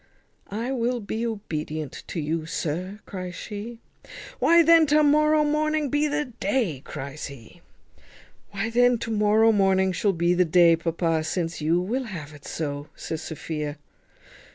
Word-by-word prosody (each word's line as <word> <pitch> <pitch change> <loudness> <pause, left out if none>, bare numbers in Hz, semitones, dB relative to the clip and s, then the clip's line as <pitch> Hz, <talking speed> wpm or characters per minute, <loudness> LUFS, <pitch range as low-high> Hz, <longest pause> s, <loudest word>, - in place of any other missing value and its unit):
"I 230 +6 -3
will 245 -1 0
be 225 +2 -3
obedient 155 -8 -5
to 175 - -4
you, 155 +1 -2
sir," 180 +7 -3
cries 185 -2 -6
she. 215 +3 -7 0.6
"Why 335 0 +6
then 330 -1 +6
to 300 +2 +4
morrow 305 +1 +4
morning 305 0 0
be 290 +3 +1
the 295 0 -1
day," 205 - -2
cries 140 +2 -6
he. 140 +4 -13 0.9
"Why 205 +3 -3
then 245 +1 +4
to 230 0 -5
morrow 215 +1 +4
morning 190 -2 +3
shall 195 +3 +1
be 170 0 +2
the 180 +1 +4
day, 170 0 +5
papa, 165 -1 -1
since 165 0 -3
you 165 +3 +2
will 240 +9 -2
have 160 -9 -7
it 145 -1 -14
so," 145 -2 -4
says 160 - -5
Sophia. 150 -2 -5
195 Hz, 155 wpm, -25 LUFS, 160-245 Hz, 0.9 s, Why